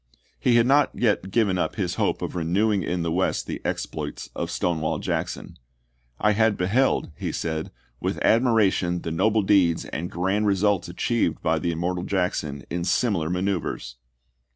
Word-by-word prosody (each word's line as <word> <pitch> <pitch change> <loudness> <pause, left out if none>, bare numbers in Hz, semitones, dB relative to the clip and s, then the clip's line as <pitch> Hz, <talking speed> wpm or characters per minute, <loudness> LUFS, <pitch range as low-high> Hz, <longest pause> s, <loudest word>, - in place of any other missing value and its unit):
He 120 - +3
had 120 -1 +5
not 140 +3 +4
yet 105 -5 +1
given 100 -3 +2
up - - -1
his - - -1
hope - - 0
of - - -4
renewing 95 +5 +1
in 90 -1 -2
the 85 - -1
West 95 +3 0
the - - -5
exploits - - -4
of - - -3
Stonewall 80 -3 -1
Jackson. - - -4 0.6
"I 105 - +3
had 110 0 +2
beheld," 105 +4 +1
he - - -3
said, 80 -1 -3 0.3
"with - - -2
admiration 105 -7 +3
the 80 - -3
noble 105 +6 +2
deeds 95 -4 +3
and 85 +2 -4
grand 95 +4 0
re 100 - +3
sults 100 -2 +1
achieved 90 -2 -1
by 80 -1 +2
the 85 +1 -1
immortal 90 +2 -2
Jackson 90 -7 -1
in 85 0 -2
similar 90 -5 +1
manoeuvres." 90 -9 -2
95 Hz, 165 wpm, -24 LUFS, 85-105 Hz, 0.6 s, had